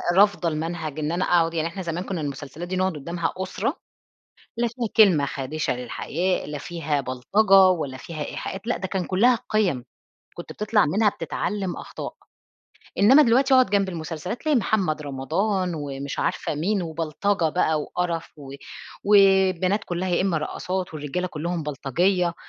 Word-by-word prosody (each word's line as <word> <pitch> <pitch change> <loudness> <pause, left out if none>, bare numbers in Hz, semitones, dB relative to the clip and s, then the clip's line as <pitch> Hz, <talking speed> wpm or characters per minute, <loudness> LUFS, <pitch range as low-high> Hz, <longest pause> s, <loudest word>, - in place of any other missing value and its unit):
رافضة 200 -3 +4
المنهج 155 -1 -4
إن 150 0 -1
أنا 180 +2 0
أقعد 165 -2 +2
يعني 165 -1 0
إحنا 185 +3 -6
زمان 170 0 -3
كُنّا 185 -4 -4
المسلسلات 145 +4 -6
دي 185 - -3
نقعد 185 0 +1
قُدّامها 170 +3 -3
أسرة، 190 - -2 0.8
لا 240 0 +1
فيها 235 0 -4
كلمة 180 -10 +6
خادِشة 140 +3 -2
للحياء، 170 +9 -2
لا 150 - -4
فيها 155 -3 -2
بلطجة 140 - +1 0.3
ولا 130 -3 -4
فيها 155 +3 -6
إيحاءات، 195 +3 -6
لأ 245 - 0
ده 190 - -4
كان 190 -1 -2
كُلّها 225 +8 +3
قِيّّم، 185 - +1 0.5
كنت 175 - -8
بتطلع 210 -3 +2
منها 205 +8 +3
بتتعلّم 200 -2 -3
أخطاء. - - -7 0.8
إنّما 260 +9 +7
دلوقتي 265 +2 +4
أقعد 255 -5 +5
جنب 200 -1 +2
المسلسلات، 165 +4 -5
تلاقي 305 -2 +2
محمد 190 -9 0
رمضان 175 +7 -1
ومش 140 -2 -5
عارفة - - -1
مين 185 +6 0
وبلطجة 165 +3 -1
بقى 160 -1 +1
وقرف 170 0 -3
و 135 -1 -10 0.5
والبنات 195 -1 +4
كُلّها 180 +1 -3
يا 175 - +1
إمّا 190 -4 +1
رقّاصات 180 +3 -4
والرجالة 155 +5 -3
كُلّهم 170 0 -3
بلطجية. 170 +6 0
175 Hz, 155 wpm, -24 LUFS, 155-195 Hz, 0.8 s, إنّما